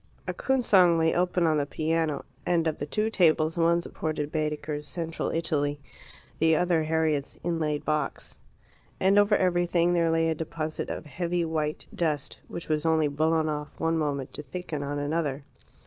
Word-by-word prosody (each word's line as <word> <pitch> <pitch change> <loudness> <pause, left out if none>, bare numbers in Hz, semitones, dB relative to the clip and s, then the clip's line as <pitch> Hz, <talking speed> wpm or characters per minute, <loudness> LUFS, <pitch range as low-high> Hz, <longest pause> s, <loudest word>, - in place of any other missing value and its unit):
A - - -1
coon 265 -1 0
song 180 -6 +5
lay 160 0 +3
open 180 0 +1
on 155 -1 +3
the 145 - -1
piano, 160 0 -1 0.2
and 170 -2 +1
of 160 -2 -1
the 145 - -3
two 215 +7 0
tables 160 -4 +3
one 170 0 +3
supported 155 -3 -3
Baedeker's 150 -1 -2
"Central 165 +1 -3
Italy," 145 -3 0 0.6
the 160 0 +4
other 175 0 +2
Harriet's 155 -3 0
inlaid 160 -3 -1
box. 150 -2 -2 0.6
And 195 +2 +5
over 205 +1 +4
everything 175 -1 +2
there 170 -1 +3
lay 165 0 +2
a - - +2
deposit 155 0 -4
of - - -5
heavy 170 +3 -1
white 155 -2 -2
dust, 150 -5 -2
which 170 - -7
was 155 -1 0
only 160 -2 +3
blown 155 +2 +1
off 150 -1 -4
one 165 0 +1
moment 140 -3 -2
to - - -6
thicken 150 +1 -5
on 145 +1 -3
another. 145 -1 -1
160 Hz, 170 wpm, -27 LUFS, 150-170 Hz, 0.6 s, song